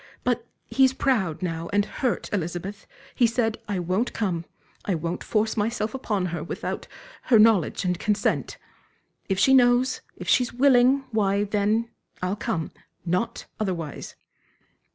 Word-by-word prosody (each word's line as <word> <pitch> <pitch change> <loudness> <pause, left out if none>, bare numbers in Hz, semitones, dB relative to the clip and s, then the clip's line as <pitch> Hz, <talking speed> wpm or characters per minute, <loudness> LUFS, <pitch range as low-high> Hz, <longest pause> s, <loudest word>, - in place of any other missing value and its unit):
But - - 0 0.2
he's 265 -1 +3
proud 205 - 0
now 165 -1 -3
and 205 0 +2
hurt, 250 +2 -2
Elizabeth 185 +2 -4 0.3
he 240 - +4
said: 225 -1 0
'I 200 -3 -1
won't 185 +8 -1
come, 180 -6 -2 0.4
I 195 - 0
won't 170 +2 -3
force 220 0 0
myself 215 +1 -1
upon 210 -8 -1
her 160 -3 -3
without 170 - -5 0.4
her 240 - +5
knowledge 210 -4 +4
and 180 -1 0
consent. 210 -1 0 0.7
If 195 - +1
she 265 +7 +5
knows, 250 0 +4 0.2
if - - -8
she's 250 -2 +3
willing, 260 +1 +4
why, 200 -2 +2
then, 210 +3 0 0.3
I'll 185 +2 -1
come 165 -5 -3 0.3
not 180 +6 -1
otherwise.'" 175 -8 -4
210 Hz, 140 wpm, -25 LUFS, 180-240 Hz, 0.7 s, her